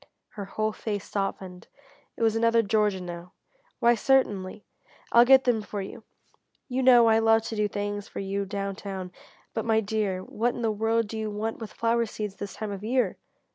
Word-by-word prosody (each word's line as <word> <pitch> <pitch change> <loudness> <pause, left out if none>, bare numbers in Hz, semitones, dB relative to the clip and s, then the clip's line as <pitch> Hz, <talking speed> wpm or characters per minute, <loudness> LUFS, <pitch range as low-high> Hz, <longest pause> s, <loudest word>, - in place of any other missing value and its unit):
Her 205 -2 -7
whole 215 +2 -1
face 205 -2 -4
softened. 190 -2 -4 0.5
It - - -2
was 225 -1 +3
another 230 0 +3
Georgia 210 -2 +1
now. 175 0 -8 0.5
"Why 235 0 +5
certainly 210 -6 +1 0.5
I'll 235 +1 +7
get 265 +1 +7
them 240 -3 +2
for 205 0 -6
you; 195 - -7 0.6
you 260 0 -1
know 245 -2 +7
I 225 0 +5
love 225 0 +4
to 225 0 -5
do 210 -1 +1
things 205 0 -4
for - - -11
you 195 +1 -2
down 195 0 -4
town, 190 -3 -6 0.4
but 225 - -2
my 220 -1 +2
dear 205 -3 -1
what 240 +5 -1
in 240 - -5
the 225 - +2
world 225 +1 0
do 220 +1 -5
you 215 -1 -2
want 215 +2 -3
with 225 -2 -7
flower 230 0 +1
seeds 210 -2 -5
this 200 -1 -6
time 215 -1 -5
of 200 0 -6
year?" 250 +3 0
215 Hz, 195 wpm, -27 LUFS, 200-230 Hz, 0.6 s, I'll